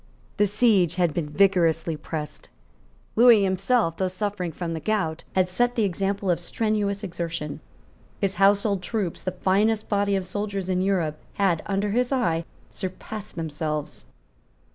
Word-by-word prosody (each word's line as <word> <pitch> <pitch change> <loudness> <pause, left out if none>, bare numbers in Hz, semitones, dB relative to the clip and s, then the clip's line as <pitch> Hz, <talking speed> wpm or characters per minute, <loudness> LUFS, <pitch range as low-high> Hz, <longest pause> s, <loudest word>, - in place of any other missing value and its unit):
The 205 0 +4
siege 200 -5 +3
had 175 -4 +1
been 155 -2 -2
vigorously 165 -2 +2
pressed. 150 0 -6 0.7
Lewis 230 -3 +7
himself, 195 -1 +1
though 190 - +1
suffering 185 -1 -3
from 165 +1 -4
the 160 - -3
gout, 165 -5 -1
had 185 -1 +3
set 245 +7 +1
the 225 - +2
example 195 0 0
of 170 - 0
strenuous 205 +1 -1
exertion. 170 -5 -4 0.6
His 195 -1 0
household 200 0 +4
troops, 190 -2 -3
the 185 - -2
finest 205 +4 +1
body 200 -1 +2
of 190 -1 -1
soldiers 200 0 -3
in 185 0 +1
Europe, 175 -6 0 0.2
had, 185 -5 +2
under 200 +1 0
his 245 +4 +1
eye, 170 -11 +1 0.3
surpassed 200 +2 -7
themselves. 155 - -4
190 Hz, 145 wpm, -25 LUFS, 170-205 Hz, 0.7 s, Lewis